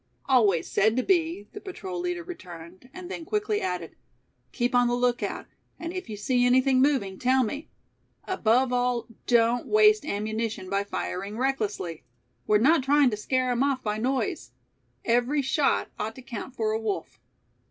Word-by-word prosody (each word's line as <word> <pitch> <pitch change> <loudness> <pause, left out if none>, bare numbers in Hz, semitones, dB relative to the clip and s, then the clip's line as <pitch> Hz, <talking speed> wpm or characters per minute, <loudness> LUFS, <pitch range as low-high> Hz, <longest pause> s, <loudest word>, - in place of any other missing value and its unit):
"Always 210 -11 +3
said 220 +4 +2
to 255 - +2
be," 330 - +1
the 415 - -8
patrol 375 -2 -6
leader 355 0 -3
returned, 185 - -11
and 370 +2 -9
then 335 - -5
quickly 420 +3 -1
added. 180 -2 -4 0.6
"Keep 245 +1 -1
on 245 0 +4
the 240 - +1
lookout, 245 0 -1 0.3
and 335 +1 -6
if 370 -9 -6
you 210 - -5
see 245 +4 +1
anything 255 +1 +4
moving, 235 -10 +1
tell 255 +1 +3
me. 285 +7 -5 0.6
Above 250 -7 +2
all 245 -1 0 0.2
don't 235 0 +3
waste 430 0 +5
ammunition 215 -4 -3
by 200 0 +1
firing 200 +1 -4
recklessly. 215 - -2 0.4
We're 210 - +5
not 280 +8 +4
trying 280 -1 +4
to - - -1
scare 255 +4 0
'em 245 0 0
off 275 -2 +1
by 210 0 -2
noise; 225 - -2 0.5
every 245 +5 +2
shot 275 +2 +1
ought 220 +1 -3
to 260 - -11
count 250 +1 -7
for 220 -3 0
a 220 +1 -1
wolf." 215 -3 -4
245 Hz, 165 wpm, -26 LUFS, 215-280 Hz, 0.6 s, waste